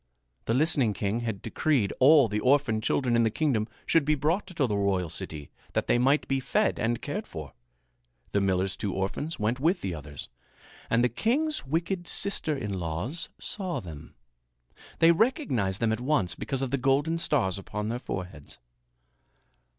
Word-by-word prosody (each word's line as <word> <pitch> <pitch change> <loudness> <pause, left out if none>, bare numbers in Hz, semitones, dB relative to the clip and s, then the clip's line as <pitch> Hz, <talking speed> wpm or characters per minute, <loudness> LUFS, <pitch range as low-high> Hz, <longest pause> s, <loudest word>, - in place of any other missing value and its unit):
The 115 - +1
listening 140 -6 +3
king 100 +3 -1
had 110 -5 -4
decreed 135 -11 +1
all 140 -1 +7
the 105 0 -1
orphaned 125 -3 +2
children 125 +2 +1
in 115 - +4
the 115 - +3
kingdom 115 -4 0 0.2
should 165 - +3
be 155 +2 +2
brought 160 +8 0
to 165 -7 0
the 105 -4 -1
royal 95 -4 0
city 75 -3 -6 0.2
that - - 0
they 120 - +2
might 135 +4 +3
be 135 0 +1
fed 130 - +1
and 115 +2 0
cared 205 +9 -4
for. 75 -5 -8 0.8
The 100 - +2
miller's 95 0 +1
two 100 -3 -3
orphans 100 - -3
went 110 +4 0
with 170 +6 +2
the 95 - -3
others, 75 -2 -8 0.6
and 115 +1 +3
the - - +5
king's 255 - 0
wicked 170 +4 -1
sister 160 -6 0
in 105 -7 -3
laws 90 - -4
saw 185 -4 -3
them. 80 -4 -10 0.8
They 165 +1 +6
recognized 165 - +1
them 115 -1 +1
at 110 - -3
once 125 - +1
because 135 +8 -3
of 130 - -3
the 140 - 0
golden 140 +6 +2
stars 110 - +1
upon 105 +2 -4
their 120 +2 -2
foreheads. 90 - -7
120 Hz, 175 wpm, -28 LUFS, 100-155 Hz, 0.8 s, all